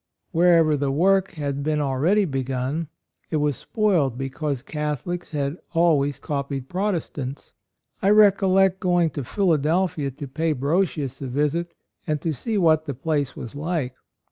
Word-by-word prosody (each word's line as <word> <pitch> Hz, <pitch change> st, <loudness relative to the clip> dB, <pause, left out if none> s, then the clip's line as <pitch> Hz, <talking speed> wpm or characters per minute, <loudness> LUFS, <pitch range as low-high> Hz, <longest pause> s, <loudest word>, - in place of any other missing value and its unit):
Wherever 165 Hz, -2 st, +4 dB
the 140 Hz, -1 st, -1 dB
work 190 Hz, +7 st, +2 dB
had 140 Hz, -4 st, -3 dB
been 150 Hz, +1 st, 0 dB
already 150 Hz, +9 st, +2 dB
begun, 135 Hz, +2 st, -2 dB, 0.4 s
it -, -, -2 dB
was 150 Hz, -2 st, +1 dB
spoiled 170 Hz, -, 0 dB
because 135 Hz, 0 st, -3 dB
Catholics 150 Hz, +4 st, -4 dB
had 145 Hz, +1 st, -2 dB, 0.2 s
always 145 Hz, -5 st, +3 dB
copied 140 Hz, -2 st, -4 dB
Protestants. 170 Hz, -8 st, -3 dB, 0.5 s
I 195 Hz, -, +3 dB
recollect 195 Hz, -2 st, +5 dB
going 175 Hz, -3 st, +2 dB
to 140 Hz, 0 st, -4 dB
Philadelphia 165 Hz, -, +1 dB
to 140 Hz, +2 st, -8 dB
pay 160 Hz, +4 st, 0 dB
Brosius 145 Hz, -2 st, -1 dB
a 135 Hz, -, -3 dB
visit 150 Hz, +6 st, -1 dB, 0.3 s
and 155 Hz, -1 st, 0 dB
to 160 Hz, +2 st, -2 dB
see 220 Hz, -, -2 dB
what 160 Hz, -4 st, +3 dB
the 140 Hz, -, -3 dB
place 145 Hz, 0 st, -1 dB
was 120 Hz, -, -7 dB
like. 150 Hz, -3 st, -2 dB
150 Hz, 140 wpm, -23 LUFS, 140-175 Hz, 0.5 s, recollect